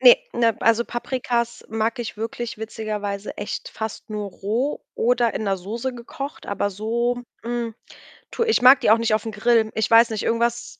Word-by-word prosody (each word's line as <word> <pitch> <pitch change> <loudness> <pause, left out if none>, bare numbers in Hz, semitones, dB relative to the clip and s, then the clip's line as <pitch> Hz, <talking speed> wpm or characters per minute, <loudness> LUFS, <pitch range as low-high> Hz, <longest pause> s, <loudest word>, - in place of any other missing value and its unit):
Ne, - - +9 0.2
ne 230 -2 +2
also 230 +1 +3
Paprikas 240 -1 -2
mag 225 +3 -1
ich 230 -3 -5
wirklich 225 +1 -4
witzigerweise 210 -2 -4
echt - - -5
fast 220 +1 -6
nur 210 -2 -4
roh 225 +10 -2
oder 240 0 +2
in - - -2
'ner 195 -2 0
Soße 230 +8 -4
gekocht, 275 +5 -7
aber 200 0 -1
so, 235 +4 -1 0.2
hm, 235 -1 -3 0.6
tu 465 - -1
ich 445 - +2
mag 260 +2 +8
die 215 - +4
auch 225 - +7
nicht 225 -1 +1
auf 215 +1 +1
'n 225 - -3
Grill. 220 +1 +2
Ich 220 -1 0
weiß 230 +1 +7
nicht, 220 -2 -3
irgendwas 235 +1 -1
230 Hz, 185 wpm, -23 LUFS, 215-240 Hz, 0.6 s, Ne